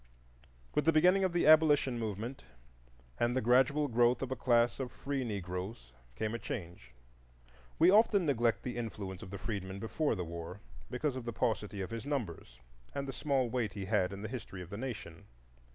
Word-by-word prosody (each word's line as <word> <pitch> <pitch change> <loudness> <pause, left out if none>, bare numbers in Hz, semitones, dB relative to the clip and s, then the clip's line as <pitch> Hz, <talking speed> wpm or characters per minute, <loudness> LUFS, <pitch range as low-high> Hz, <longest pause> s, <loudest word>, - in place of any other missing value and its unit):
With 150 - +1
the 165 - +6
beginning 180 +5 +5
of 185 - +2
the 175 0 +1
abolition 150 -5 +5
movement 110 +4 -4 0.8
and 120 +2 +1
the - - +4
gradual 130 +5 +3
growth 120 0 +3
of 130 - -4
a - - 0
class 120 -1 +2
of 130 -2 -3
free 140 -1 -3
Negroes 95 - -5 0.2
came 110 - -2
a 120 - -3
change. 85 - -6 0.9
We 170 +3 +6
often 205 -3 +5
neglect 120 -5 +1
the 125 -1 -4
influence 100 -5 -5
of - - -9
the 100 - -6
freedman 100 -3 -4
before 115 +7 -1
the 90 - -3
war, 85 +3 -7 0.3
because 130 +2 -1
of 130 -2 -5
the 120 - -3
paucity 105 -2 -1
of 95 - -5
his 115 +3 -5
numbers 95 - -4 0.4
and 140 0 -2
the 135 - -4
small 135 -2 +1
weight 115 -4 -1
he 100 -2 -5
had 95 -2 +1
in 100 +1 -7
the - - -3
history 105 -7 -6
of 90 - -13
the - - -4
nation. 110 -9 -6
120 Hz, 190 wpm, -33 LUFS, 100-135 Hz, 0.9 s, the